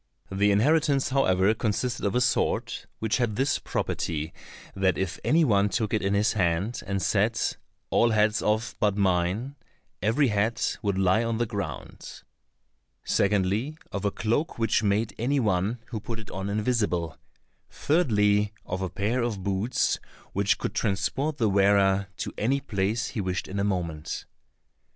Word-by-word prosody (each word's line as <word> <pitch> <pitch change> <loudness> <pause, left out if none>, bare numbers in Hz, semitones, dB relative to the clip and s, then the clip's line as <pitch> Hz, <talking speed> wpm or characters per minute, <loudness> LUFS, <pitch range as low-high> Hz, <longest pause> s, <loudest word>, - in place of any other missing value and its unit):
The 100 +2 +2
inheritance, 140 +6 +3
however, 100 -7 +3
consisted 115 +3 -2
of 100 - -2
a 125 - +3
sword, 120 - +1 0.2
which 110 -1 0
had 120 -5 0
this 135 +5 +1
property 80 -1 -3 0.4
that 95 -1 +2
if 95 +1 -2
any 160 +1 +4
one 105 -4 +3
took 105 +3 -1
it 110 - +2
in 100 +1 +1
his 105 +2 +2
hand, 95 +3 0
and 100 0 -1
said, 90 - +1 0.5
"All 120 - +4
heads 110 0 +2
off 110 +1 0
but 105 -1 +1
mine," 95 +8 0 0.4
every 115 +8 +2
head 110 +3 0 0.2
would 100 -2 -1
lie 95 +4 +3
on 115 -1 -1
the 120 - +1
ground; 105 -3 -6 0.8
secondly, 105 +9 +1
of 100 - -4
a 100 - +2
cloak 115 +10 -1
which 115 -1 +2
made 105 +1 +1
any 135 +5 +1
one 105 0 +1
who 115 - -4
put 115 +2 -6
it 110 -1 -10
on 95 +1 -4
invisible; 105 -7 0 0.5
thirdly, 105 -10 +2
of 90 +1 -4
a 95 - -2
pair 105 +7 -1
of 110 -5 -2
boots 100 +5 0 0.3
which 100 +1 +2
could - - -3
transport 115 - -1
the 115 -6 +2
wearer 100 0 +3
to - - -4
any 135 +6 +1
place 110 -2 -1
he 110 - -3
wished 95 -1 -2
in 100 +1 -4
a - - +1
moment. 85 -6 -3
105 Hz, 160 wpm, -26 LUFS, 95-115 Hz, 0.8 s, any